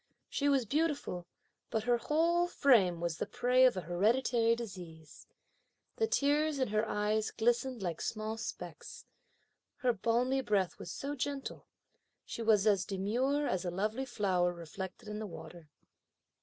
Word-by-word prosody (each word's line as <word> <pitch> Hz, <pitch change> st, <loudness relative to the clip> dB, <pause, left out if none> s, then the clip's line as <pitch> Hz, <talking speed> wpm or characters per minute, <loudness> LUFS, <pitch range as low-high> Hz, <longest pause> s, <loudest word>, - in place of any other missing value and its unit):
She 285 Hz, 0 st, +1 dB
was 270 Hz, -4 st, +3 dB
beautiful, 285 Hz, -, -1 dB, 0.4 s
but 220 Hz, -, -1 dB
her 240 Hz, +1 st, +3 dB
whole 335 Hz, +6 st, +2 dB
frame 215 Hz, -, +4 dB
was 170 Hz, -2 st, -2 dB
the -, -, -3 dB
prey 250 Hz, +1 st, +3 dB
of 250 Hz, -6 st, +3 dB
a -, -, -1 dB
hereditary 230 Hz, +7 st, +2 dB
disease. 175 Hz, -9 st, -9 dB, 0.7 s
The 445 Hz, -, +2 dB
tears 295 Hz, -4 st, +2 dB
in 260 Hz, -4 st, 0 dB
her 215 Hz, +1 st, +1 dB
eyes 210 Hz, +1 st, 0 dB
glistened 240 Hz, 0 st, 0 dB
like 170 Hz, -3 st, -3 dB
small 215 Hz, 0 st, -3 dB
specks. 225 Hz, -, -7 dB, 0.7 s
Her 250 Hz, -2 st, +1 dB
balmy 240 Hz, +5 st, +1 dB
breath 200 Hz, -7 st, 0 dB
was -, -, -7 dB
so 280 Hz, +1 st, -4 dB
gentle. 280 Hz, 0 st, -4 dB, 0.6 s
She -, -, -6 dB
was 220 Hz, -3 st, +4 dB
as 200 Hz, -3 st, +4 dB
demure 240 Hz, +10 st, 0 dB
as 185 Hz, -9 st, -1 dB
a 180 Hz, -, -2 dB
lovely 215 Hz, +8 st, -2 dB
flower 190 Hz, -7 st, +1 dB
reflected 180 Hz, +4 st, -8 dB
in 210 Hz, 0 st, -5 dB
the 215 Hz, -, -4 dB
water. 170 Hz, -3 st, -11 dB
225 Hz, 150 wpm, -33 LUFS, 190-265 Hz, 0.7 s, frame